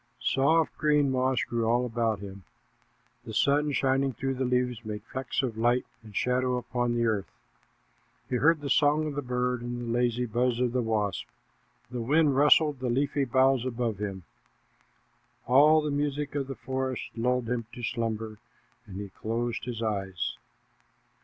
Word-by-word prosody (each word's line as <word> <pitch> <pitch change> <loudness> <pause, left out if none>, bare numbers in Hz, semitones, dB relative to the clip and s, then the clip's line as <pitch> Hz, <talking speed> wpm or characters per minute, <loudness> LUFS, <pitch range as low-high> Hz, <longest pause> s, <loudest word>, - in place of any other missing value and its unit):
Soft, 155 +4 +2
green 150 -2 +3
moss 130 0 +1
grew 115 -1 -1
all 120 +2 +2
about 115 -3 -1
him. 100 -1 -8 0.8
The 110 - -7
sun 145 +4 +3
shining 135 0 +1
through 135 +2 -2
the 130 0 -2
leaves 125 -2 0
made 105 -1 -6
flecks 130 +3 -3
of 115 -4 -3
light 120 +2 +2 0.2
and 110 -2 -14
shadow 125 0 +1
upon 120 0 -1
the 120 0 +1
earth. 105 -4 0 1.0
He 125 - 0
heard 155 +4 +3
the 140 - -4
song 150 +2 +3
of 150 - -3
the 145 - -2
bird 125 -1 -1
and 120 0 -4
the 120 -1 -3
lazy 120 0 +1
buzz 120 +1 0
of 125 -1 +1
the 125 0 0
wasp. 110 -4 -1 0.6
The 125 -1 -3
wind 145 +3 +3
rustled 150 0 +5
the 125 -1 -2
leafy 140 +3 +1
boughs 130 0 +3
above 120 -4 -2
him. 95 -3 -4 1.2
All 150 +5 +6
the 150 - -1
music 145 0 -1
of 140 -2 -2
the 135 - -5
forest 130 -1 -3
lulled 125 +1 0
him 115 -1 -2
to 120 - -8
slumber, 110 -3 -3 0.5
and 95 -1 -7
he 100 -1 -6
closed 115 +4 -3
his 120 -2 -4
eyes. 95 -4 -2
125 Hz, 165 wpm, -28 LUFS, 115-135 Hz, 1.2 s, All